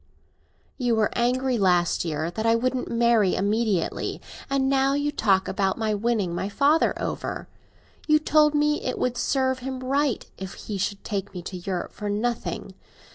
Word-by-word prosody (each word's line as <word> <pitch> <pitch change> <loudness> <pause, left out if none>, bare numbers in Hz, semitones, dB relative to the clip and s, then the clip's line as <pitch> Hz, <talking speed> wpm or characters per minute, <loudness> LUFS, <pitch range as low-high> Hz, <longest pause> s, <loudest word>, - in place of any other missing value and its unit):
"You 245 -2 +2
were 215 -1 +2
angry 250 +1 +1
last 180 -3 +2
year 160 +1 -2
that 220 +5 -3
I 230 0 +4
wouldn't 255 +2 -1
marry 230 -4 +3
immediately, 205 -2 0 0.3
and 275 -1 +1
now 270 0 +2
you 290 +1 0
talk 195 -7 +2
about 195 -2 0
my 220 -2 0
winning 210 -4 0
my 190 +3 -2
father 290 +9 +2
over. - - -4 0.6
You 305 -1 +6
told 305 0 +3
me 300 0 +2
it 255 - -2
would 250 -1 0
serve 260 0 0
him 260 0 -5
right 275 -1 0
if 190 0 -6
he 205 -2 -6
should 200 +1 -2
take 200 -2 -4
me 180 - -5
to 185 - -6
Europe 180 0 -4
for 210 - -5
nothing. 225 +4 -2
230 Hz, 170 wpm, -25 LUFS, 195-265 Hz, 0.6 s, You